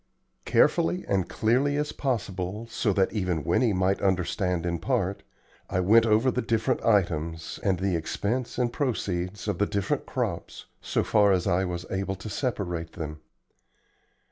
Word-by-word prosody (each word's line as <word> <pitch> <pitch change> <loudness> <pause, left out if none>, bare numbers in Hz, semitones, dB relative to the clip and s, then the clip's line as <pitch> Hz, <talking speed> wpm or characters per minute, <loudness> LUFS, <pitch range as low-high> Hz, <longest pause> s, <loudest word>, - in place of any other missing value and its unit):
Carefully 85 +2 +3
and 95 -3 0
clearly 130 +6 +2
as 150 0 -1
possible, 105 -5 -3
so 115 -2 -1
that 95 0 +1
even 90 -7 -1
Winnie 110 +7 +2
might 95 0 +1
understand 90 -2 0
in 85 -1 -1
part, 100 -7 -1 0.5
I 90 - 0
went 110 +5 +5
over 110 +4 +4
the 125 - -1
different 115 -2 0
items, 85 -6 0
and 95 -2 +1
the 95 -1 0
expense 110 +9 -2
and 120 -1 0
proceeds 100 -8 -2
of 100 -4 -1
the 105 - +2
different 100 -2 -1
crops, - - -3 0.2
so - - 0
far 105 -1 +4
as 90 -2 +2
I 95 0 +2
was 85 -1 -4
able 95 0 -2
to 95 +3 -8
separate 95 - -3
them. 75 -2 -6
95 Hz, 155 wpm, -27 LUFS, 90-115 Hz, 0.5 s, went